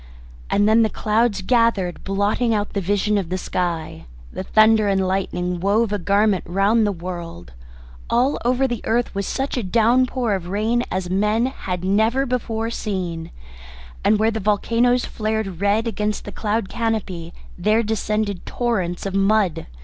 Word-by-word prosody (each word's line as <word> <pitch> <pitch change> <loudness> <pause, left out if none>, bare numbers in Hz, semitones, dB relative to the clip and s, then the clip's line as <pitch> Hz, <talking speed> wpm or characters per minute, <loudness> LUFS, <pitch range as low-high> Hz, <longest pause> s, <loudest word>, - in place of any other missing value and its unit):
And 205 +1 +3
then 220 +1 +5
the 220 - +3
clouds 215 -2 0
gathered, 230 -6 +1
blotting 205 +4 +1
out 205 0 -2
the 200 - -1
vision 205 +2 +1
of 180 -4 -5
the 185 - -1
sky, 165 - -3 0.3
the - - -4
thunder 215 +2 +4
and 195 -1 +1
lightning 180 -2 -2
wove 205 +4 +1
a 205 - 0
garment 200 +1 +2
round 200 +5 +2
the - - +1
world; 170 - -7 0.6
all 250 +4 +2
over 255 +2 +2
the 240 -4 -4
earth 235 +2 0
was 200 -1 -3
such 270 0 -2
a - - 0
downpour 235 +3 +2
of 185 -3 -3
rain 215 +5 0
as 185 -1 -3
men 210 +4 +2
had 185 -9 -4
never 220 +7 +2
before 230 -3 -2
seen, 180 -7 -4 0.7
and 215 - +4
where 220 +2 +2
the 220 - -3
volcanoes 230 +4 +2
flared 215 -5 -3
red 205 +3 +2
against 210 -1 -2
the 205 - -6
cloud 215 -1 -1
canopy 205 -7 -3 0.2
there 215 +5 +2
descended 210 -2 -2
torrents 195 -8 -2
of 195 - -3
mud. 195 - +1
210 Hz, 160 wpm, -21 LUFS, 190-225 Hz, 0.7 s, then